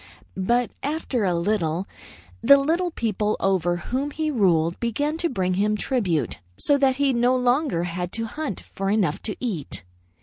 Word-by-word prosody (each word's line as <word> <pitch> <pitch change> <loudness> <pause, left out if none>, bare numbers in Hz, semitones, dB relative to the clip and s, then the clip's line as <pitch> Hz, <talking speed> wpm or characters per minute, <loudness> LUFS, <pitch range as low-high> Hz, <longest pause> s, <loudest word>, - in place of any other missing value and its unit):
But 235 +6 +1
after 280 -6 -1
a 180 -2 +1
little, 170 -1 0 0.5
the 280 - +8
little 330 +6 +1
people 215 - -1
over 180 -3 +1
whom 260 +10 -2
he 310 +1 -2
ruled 170 - +2
began 290 +7 -1
to 340 0 0
bring 185 -7 0
him 210 +3 +1
tribute, 185 - -1 0.2
so 285 - +3
that 270 -1 +3
he 275 -1 +2
no 245 +1 +3
longer 250 - +1
had 175 0 -3
to 225 0 -2
hunt 285 - -4
for 195 0 -2
enough 200 -7 +1
to 210 - -4
eat. 195 - -4
220 Hz, 165 wpm, -24 LUFS, 180-270 Hz, 0.5 s, the